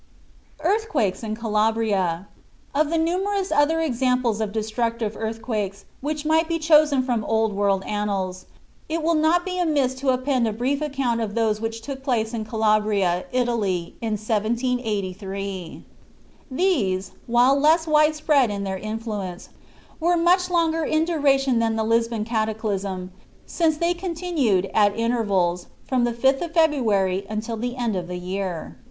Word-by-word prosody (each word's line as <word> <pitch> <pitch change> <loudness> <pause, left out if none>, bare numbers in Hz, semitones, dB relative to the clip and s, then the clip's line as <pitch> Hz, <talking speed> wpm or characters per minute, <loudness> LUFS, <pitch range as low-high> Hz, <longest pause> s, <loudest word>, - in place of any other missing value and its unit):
EARTHQUAKES 320 - 0
IN 215 -2 -3
CALABRIA 210 -5 0 0.5
Of 295 +1 +2
the 330 - +1
numerous 375 +4 0
other 295 +3 +3
examples 250 -5 +1
of 215 -2 -2
destructive 220 0 -2
earthquakes 220 -3 -4
which 300 +2 -3
might 320 +1 +3
be 335 0 0
chosen 305 -4 +4
from 240 -4 -1
Old 220 -1 +1
World 200 -1 +1
annals, 195 -3 -3 0.4
it 325 0 -2
will 335 +1 +2
not 325 +3 +2
be 365 -1 -3
amiss 290 -7 +1
to 275 - +1
append 255 -1 +1
a 220 - -1
brief 260 +6 -1
account 270 -6 -1
of 210 -2 -3
those 220 -2 +1
which 225 0 -4
took 270 0 -6
place 240 -4 -1
in 220 -2 -3
Calabria, 210 -5 +1
Italy, 220 -9 -1
in 225 -2 -1
1783. 205 -4 -2 0.6
These, 255 - 0 0.2
while 245 +3 +4
less 320 +3 +4
wide 305 -1 +4
spread 295 -5 +3
in 200 -1 -3
their 190 -1 -3
influence, 215 -4 -5 0.5
were 345 +2 +2
much 360 +2 +3
longer 330 -2 +1
in 310 +1 +1
duration 275 -6 +2
than 225 -1 +1
the 220 - 0
Lisbon 230 -1 +1
cataclysm, 210 -4 -2 0.3
since 320 -3 +1
they 340 +2 +1
continued, 330 - 0
at 205 -1 +3
intervals, 200 -7 0 0.2
from 255 -2 +2
the 240 - -1
5th 265 +3 +2
of 340 -1 -5
February 215 - +2
until 215 +2 -3
the 245 +3 -3
end 235 -4 -1
of 180 -1 -3
the 180 0 -5
year. 180 -5 -5
230 Hz, 150 wpm, -23 LUFS, 210-300 Hz, 0.6 s, chosen